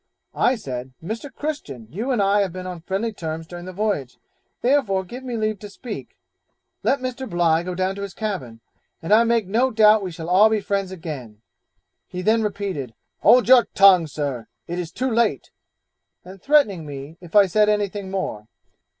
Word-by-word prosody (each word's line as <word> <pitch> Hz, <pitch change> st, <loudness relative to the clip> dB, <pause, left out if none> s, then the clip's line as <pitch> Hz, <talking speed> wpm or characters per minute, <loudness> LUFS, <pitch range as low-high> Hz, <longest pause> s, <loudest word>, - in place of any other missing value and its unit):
I 255 Hz, -, +2 dB
said, 130 Hz, -, -6 dB
Mr. 225 Hz, -, -5 dB
Christian, 220 Hz, -, -5 dB
you 220 Hz, -, -4 dB
and 240 Hz, -6 st, +2 dB
I 200 Hz, +1 st, +3 dB
have 195 Hz, -3 st, -1 dB
been 185 Hz, +1 st, -7 dB
on 180 Hz, -2 st, -6 dB
friendly 200 Hz, +6 st, -2 dB
terms 160 Hz, -3 st, -5 dB
during 175 Hz, +1 st, -9 dB
the 185 Hz, -, -6 dB
voyage, 185 Hz, -, -2 dB, 0.5 s
therefore 240 Hz, -8 st, +2 dB
give 245 Hz, +8 st, -9 dB
me 245 Hz, -3 st, -4 dB
leave 215 Hz, -2 st, -1 dB
to 205 Hz, -, -9 dB
speak, 220 Hz, +2 st, -8 dB, 0.6 s
let 275 Hz, -1 st, +1 dB
Mr. 255 Hz, 0 st, -4 dB
Bligh 170 Hz, -2 st, +2 dB
go 180 Hz, +1 st, -5 dB
down 185 Hz, +1 st, 0 dB
to 200 Hz, -, -7 dB
his 200 Hz, -2 st, -6 dB
cabin, 135 Hz, -, -4 dB, 0.4 s
and 165 Hz, +6 st, 0 dB
I 225 Hz, +2 st, +7 dB
make 230 Hz, -2 st, +2 dB
no 230 Hz, +7 st, +2 dB
doubt 215 Hz, -2 st, +5 dB
we 190 Hz, -, -4 dB
shall 165 Hz, -1 st, -8 dB
all 195 Hz, +5 st, +6 dB
be 220 Hz, -1 st, +1 dB
friends 200 Hz, -2 st, -2 dB
again; 140 Hz, -, -8 dB, 0.6 s
he 180 Hz, 0 st, -6 dB
then 225 Hz, +3 st, +3 dB
repeated, 195 Hz, -, -3 dB, 0.2 s
'Hold 250 Hz, -1 st, +5 dB
your 255 Hz, -1 st, +7 dB
tongue, 190 Hz, -4 st, +7 dB
Sir; 140 Hz, -5 st, -4 dB, 0.2 s
it 175 Hz, +1 st, -4 dB
is 170 Hz, -2 st, -5 dB
too 255 Hz, +6 st, -2 dB
late'; 225 Hz, -, 0 dB, 0.7 s
and 185 Hz, +1 st, -12 dB
threatening 245 Hz, -, +3 dB
me 145 Hz, +3 st, -8 dB
if 175 Hz, +2 st, -12 dB
I 205 Hz, -1 st, +8 dB
said 210 Hz, +3 st, +3 dB
anything 205 Hz, -2 st, -1 dB
more. 185 Hz, -, -4 dB
195 Hz, 185 wpm, -22 LUFS, 165-220 Hz, 0.7 s, I